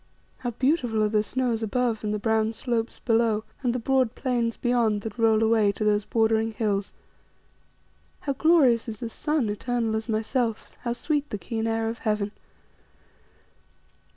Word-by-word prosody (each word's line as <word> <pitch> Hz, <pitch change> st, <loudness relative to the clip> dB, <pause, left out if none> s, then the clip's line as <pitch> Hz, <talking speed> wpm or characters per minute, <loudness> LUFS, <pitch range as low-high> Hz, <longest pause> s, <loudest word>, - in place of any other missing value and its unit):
How 245 Hz, -, -2 dB
beautiful 245 Hz, -3 st, +1 dB
are 210 Hz, -, +2 dB
the 210 Hz, 0 st, +2 dB
snows 240 Hz, 0 st, -1 dB
above, 225 Hz, 0 st, 0 dB
and 210 Hz, -, -1 dB
the 210 Hz, -, 0 dB
brown 220 Hz, +1 st, +1 dB
slopes 230 Hz, -1 st, -2 dB
below, 225 Hz, -2 st, +1 dB, 0.2 s
and 250 Hz, -3 st, +1 dB
the 250 Hz, -, -1 dB
broad 255 Hz, -1 st, +1 dB
plains 240 Hz, -3 st, -1 dB
beyond 235 Hz, -4 st, +1 dB
that 225 Hz, +2 st, -7 dB
roll 225 Hz, -1 st, +4 dB
away 220 Hz, -2 st, +4 dB
to 215 Hz, -, -4 dB
those 210 Hz, -1 st, +2 dB
bordering 225 Hz, 0 st, +1 dB
hills! 205 Hz, -3 st, -1 dB, 1.3 s
How 280 Hz, -, -1 dB
glorious 265 Hz, -6 st, +4 dB
is 215 Hz, -, -7 dB
the 235 Hz, -2 st, -4 dB
sun, 295 Hz, +1 st, -1 dB
eternal 225 Hz, +1 st, -1 dB
as 220 Hz, +2 st, -3 dB
myself; 225 Hz, +1 st, -1 dB
how 235 Hz, -, -2 dB
sweet 295 Hz, +3 st, -1 dB
the 210 Hz, -, -3 dB
keen 225 Hz, +4 st, -3 dB
air 225 Hz, 0 st, 0 dB
of 225 Hz, +1 st, -4 dB
heaven. 210 Hz, -1 st, -1 dB
225 Hz, 160 wpm, -26 LUFS, 220-245 Hz, 1.3 s, roll